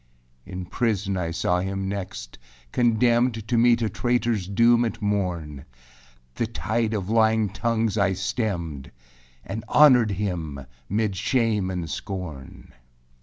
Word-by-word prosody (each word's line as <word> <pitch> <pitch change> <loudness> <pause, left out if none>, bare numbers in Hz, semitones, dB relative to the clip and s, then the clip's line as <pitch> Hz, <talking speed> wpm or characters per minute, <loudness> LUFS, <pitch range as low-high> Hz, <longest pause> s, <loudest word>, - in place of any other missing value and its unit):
6. - - -12
In 90 0 -5
prisân 105 -2 -1
I 90 -3 -2
saw 90 +1 0
him 95 +1 -3
next, 95 -7 -6 0.3
condemned 120 -1 +2
To 120 - 0
meet 120 0 +4
a - - +1
traitorâs 115 -1 0
doom 120 +1 +5
at 115 -1 -3
morn. 90 -9 -2 0.7
The 115 - -2
tide 115 0 -1
of 95 -3 -3
lying 110 -2 +3
tongues 110 +1 -1
I 100 -1 +2
stemmed, 90 - -3 0.6
And 110 +3 -5
honored 130 -7 +6
him 85 -9 -3 0.2
âmid 105 0 0
shame 105 -1 0
and 90 -3 -3
scorn. 80 -4 -7
105 Hz, 130 wpm, -24 LUFS, 90-115 Hz, 0.7 s, honored